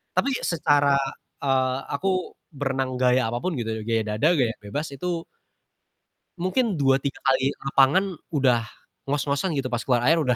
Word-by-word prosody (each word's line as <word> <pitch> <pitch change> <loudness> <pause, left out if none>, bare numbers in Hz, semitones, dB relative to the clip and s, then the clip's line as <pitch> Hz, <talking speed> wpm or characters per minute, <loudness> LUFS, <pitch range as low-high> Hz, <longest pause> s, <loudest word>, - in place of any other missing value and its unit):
Tapi, 275 - +2 0.2
secara 145 -4 +3 0.5
eee, 130 -2 +2 0.2
aku 165 +7 -2 0.5
berenang 135 -2 -1
gaya 125 0 +3
apapun 120 +11 -2
gitu 115 - -3
ya, 110 - -5
gaya 115 -1 +2
dada 105 +7 +1
gaya 115 -4 +1
bebas 145 +10 -3
itu 170 +3 -3 1.1
mungkin 200 +4 +1
dua 135 -3 +3
tiga 140 0 -4
kali 135 0 +2
lapangan 135 +7 +4 0.3
udah 125 -7 +2 0.4
ngos-ngosan 145 +5 0
gitu, 135 -2 -1
pas 120 - 0
keluar 125 -2 +2
air 165 - +5
udah 130 -5 +2
135 Hz, 150 wpm, -24 LUFS, 125-150 Hz, 1.1 s, air